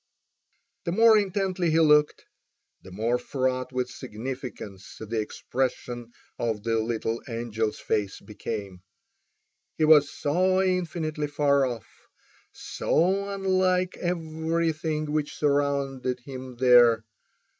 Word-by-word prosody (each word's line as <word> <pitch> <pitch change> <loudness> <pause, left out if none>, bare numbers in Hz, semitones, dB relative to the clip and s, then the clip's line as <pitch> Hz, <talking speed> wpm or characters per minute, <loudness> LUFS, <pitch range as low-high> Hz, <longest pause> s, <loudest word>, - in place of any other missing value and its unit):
The 170 - -1
more 225 +4 +6
intently 190 -3 0
he 160 +1 +3
looked 150 -2 +4 0.6
the 95 - -13
more 115 +6 -1
fraught 130 0 -2
with 125 -1 -1
significance 120 -5 -7
the 110 +1 -3
expression 120 +1 -3 0.3
of 110 -3 -2
the 115 0 +1
little 115 0 -2
angel's 115 -2 -2
face 100 -2 -2
became. 100 -3 -6 1.0
He 155 - +3
was 150 -2 +6
so 185 +5 +1
infinitely 165 -5 -1
far 140 -2 +2
off, 120 -4 -5 0.7
so 195 +4 0
unlike 185 -2 +1
everything 160 -2 -2
which 150 -1 -2
surrounded 140 -3 0
him 130 -1 -8
there. 120 -2 +5
140 Hz, 105 wpm, -26 LUFS, 120-165 Hz, 1.0 s, more